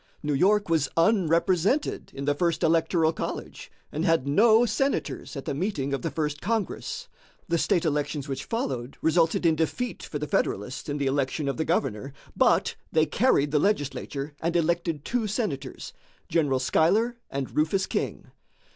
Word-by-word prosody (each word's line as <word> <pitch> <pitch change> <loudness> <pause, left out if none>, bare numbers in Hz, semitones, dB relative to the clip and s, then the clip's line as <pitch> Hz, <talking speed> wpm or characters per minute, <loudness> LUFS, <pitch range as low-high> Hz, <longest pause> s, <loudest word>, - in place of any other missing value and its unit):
New 150 0 0
York 200 +8 +3
was 160 -5 +1
unrepresented 185 - +2
in 140 0 -4
the 145 - +2
first 170 +2 0
electoral 165 0 +3
college, - - -6 0.2
and 155 - -2
had 165 -6 +2
no 220 +10 +5
senators 270 - -1
at 135 - -6
the - - -2
meeting 140 -4 -2
of 135 - -1
the - - -2
First 150 -2 -3
Congress. 220 0 -2 0.4
The 170 -2 +1
state 170 +1 +1
elections 145 -2 -1
which 135 -1 -4
followed 130 - -3
resulted 165 +1 +2
in 165 -1 +4
defeat 210 +10 -2
for 150 - -5
the 150 - -3
Federalists 130 +1 -2
in 145 - -2
the 140 - -1
election 140 +2 0
of 140 - -1
the 160 - -1
governor, 135 -5 -1 0.2
but - - +3 0.2
they 155 -1 +3
carried 150 - +2
the 150 - +3
legislature 145 -5 -1
and 170 +1 -1
elected 170 -2 0
two 240 -3 0
senators, 195 - -4 0.4
General 145 -6 +2
Schuyler 200 - +2
and 135 -1 -4
Rufus 160 +5 +2
King. - - -3
160 Hz, 165 wpm, -26 LUFS, 140-185 Hz, 0.4 s, no